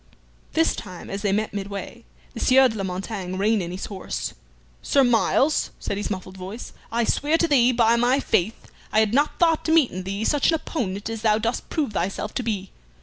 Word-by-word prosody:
This 325 0 +2
time 185 -4 -8
as 195 +1 -4
they 205 -2 +1
met 210 +1 -1
midway 200 - -6 0.3
the - - -7
Sieur 265 +1 +6
de 220 - -6
la 200 - -3
Montaigne 185 0 -4
reined 210 +2 +2
in 170 - -4
his 180 +2 -5
horse. 195 -3 -5 0.5
"Sir 275 - +3
Myles," 260 +4 +2
said - - -3
his 205 +1 -3
muffled 185 -1 -6
voice, 190 +6 -8 0.2
"I 235 +1 +1
swear 295 +7 +1
to 335 - +2
thee, 255 -5 +4
by 230 -1 +4
my 245 +3 +3
faith, 215 -4 -1 0.2
I 215 - +3
had 220 0 +2
not 290 +3 +2
thought 330 -2 +3
to 320 - +1
meet 320 -6 +4
in 185 - -5
thee 195 +3 -3
such 290 +2 +2
an 330 - +4
opponent 205 - -3
as 225 -1 -4
thou 215 -1 +3
dost 225 +2 -2
prove 290 -9 -1
thyself 195 +3 -2
to - - -1
be. 205 -5 -3
220 Hz, 210 wpm, -24 LUFS, 195-255 Hz, 0.5 s, Sieur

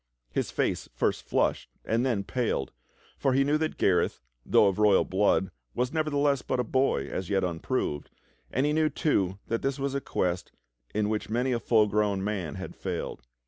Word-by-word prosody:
His - - -1
face - - -1
first - - 0
flushed - - 0 0.2
and 115 +2 +1
then 115 -7 0
paled, 115 - -1 0.5
for 135 -2 +2
he 135 +1 +4
knew 145 +2 +2
that 155 0 -2
Gareth, 90 -2 +2 0.2
though - - +5
of 100 0 +1
royal 105 -2 +5
blood, 95 -1 +2 0.2
was 125 +3 0
nevertheless 145 -3 +1
but - - -2
a - - +2
boy 130 - +1
as 95 - -4
yet 100 -1 +2
unproved, 85 - -2 0.4
and 130 +3 +1
he 150 - +2
knew, 155 0 +3
too, 100 - 0
that 115 - -2
this 135 0 -1
was 140 0 -2
a 140 - -1
quest 90 -6 -2 0.4
in 105 -1 +2
which 105 -1 -2
many 125 +4 +1
a 120 - +1
full 110 -2 +4
grown 105 -2 +1
man 95 -8 -2
had - - -7
failed. - - -4
115 Hz, 185 wpm, -28 LUFS, 95-135 Hz, 0.5 s, though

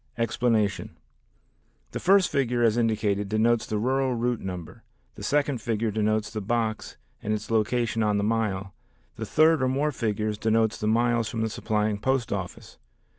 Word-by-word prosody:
Explanation: 115 -3 0 0.9
The - - -4
first 195 0 +4
figure 125 -4 +1
as 115 -2 +3
indicated 105 -3 0
denotes 110 +2 +2
the 110 - -2
rural 130 +3 0
route 120 0 -1
number, 90 +4 -7 0.3
the - - -12
second 145 -4 0
figure 115 -1 -1
denotes 110 0 0
the 110 - -4
box 110 +1 -2 0.2
and 105 - -3
its 105 0 -3
location 115 +1 +1
on 105 -1 +2
the 100 - 0
mile, 100 -3 -1 0.4
the - - -5
third 155 -1 +4
or 130 - +2
more 140 +4 0
figures 110 -3 -2
denotes 110 0 +1
the 105 - -2
miles 115 0 +2
from 115 - -3
the 110 -1 -1
supplying 105 -1 -1
post 130 +1 0
office. 95 -3 -7
110 Hz, 165 wpm, -26 LUFS, 105-120 Hz, 0.9 s, first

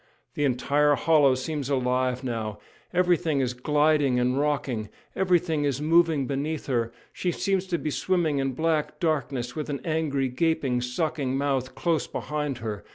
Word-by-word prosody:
The 145 - 0
entire 145 +3 +2
hollow 145 -4 +4
seems 145 +1 -3
alive 130 -1 0
now; 110 -4 -3 0.3
everything 175 -4 +2
is 125 -2 0
gliding 145 0 +2
and 125 +1 +1
rocking, 135 -7 -1 0.3
everything 175 -5 +2
is 140 -2 0
moving 160 -2 +3
beneath 145 +3 -3
her; 120 -4 0 0.2
she 180 - -1
seems 190 +1 -1
to 175 -2 0
be 155 - -3
swimming 165 -4 +1
in 135 -1 -1
black 155 +2 -1
darkness 135 -6 -1
with 155 -1 -4
an 140 -1 -2
angry, 155 -5 0
gaping, 130 -2 0
sucking 135 +1 -1
mouth 135 -2 -1
close 165 -2 0
behind 150 -3 -3
her. 110 -3 -5
145 Hz, 155 wpm, -26 LUFS, 130-160 Hz, 0.3 s, hollow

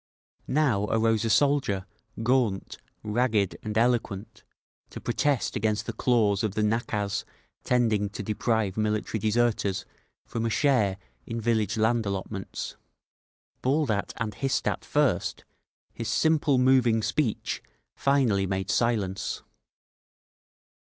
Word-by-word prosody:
Now 130 -8 +2
arose 115 0 +1
a - - 0
soldier, 130 -6 +2 0.4
gaunt, 120 -5 +1 0.2
ragged 110 -3 +1
and 110 0 -3
eloquent, 115 -4 0 0.5
to - - -8
protest 145 -5 0
against 110 0 0
the - - -4
clause 110 -5 +2
of 105 -2 -1
the 110 - +1
nakaz 105 -2 -1 0.4
tending 110 -5 +2
to 105 - -6
deprive 105 -1 0
military 110 0 -1
deserters 105 -2 +1 0.4
from 115 - -3
a 115 - +1
share 115 -7 +2 0.3
in 115 0 -3
village 110 -1 0
land 110 0 +2
allotments. 95 0 -5 0.8
Bawled 140 0 +1
at 100 -1 -1
and 110 -2 -2
hissed 135 +4 -1
at - - -1
first, - - 0 0.5
his - - -5
simple, 155 -3 +3
moving 125 -3 +4
speech 125 -5 -1 0.3
finally 125 -9 +2
made 95 0 -1
silence. 105 -6 0
110 Hz, 120 wpm, -27 LUFS, 105-125 Hz, 0.8 s, moving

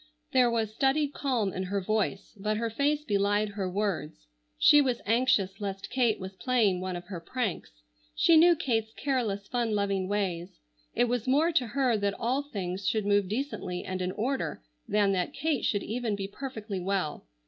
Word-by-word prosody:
There 255 -4 +4
was 225 -2 -1
studied 280 +4 +1
calm 240 -10 0
in 185 - -3
her 200 +2 -1
voice, 200 0 -1
but 210 +2 -1
her 230 0 -2
face 290 +5 +1
belied 205 -2 +1
her 200 -2 -3
words. 180 - -3 0.3
She 295 - +7
was 255 -4 0
anxious 210 -4 +2
lest 195 -1 -5
Kate 245 -4 +2
was 190 0 -7
playing 210 -5 +1
one 185 -1 -3
of 175 0 -7
her 180 -1 -6
pranks. 165 - -4 0.3
She 335 - +5
knew 340 +2 +7
Kate's 225 -8 -1
careless, 225 -8 -1
fun 235 -3 0
loving 200 -2 0
ways. 190 -3 -2 0.4
It - - +4
was 245 0 -2
more 300 +6 +3
to 265 -7 +1
her 250 0 +1
that 200 -1 0
all 255 +4 0
things 195 -8 -4
should 215 -2 +1
move 205 -1 +3
decently 215 -6 -3
and 185 0 -3
in 180 0 -1
order 250 - -2 0.2
than 205 -1 +3
that 180 -2 -1
Kate 290 -2 0
should 205 -2 0
even 230 -1 -2
be 195 -1 -4
perfectly 220 -3 -6
well. 180 - -2
210 Hz, 180 wpm, -29 LUFS, 195-255 Hz, 0.4 s, She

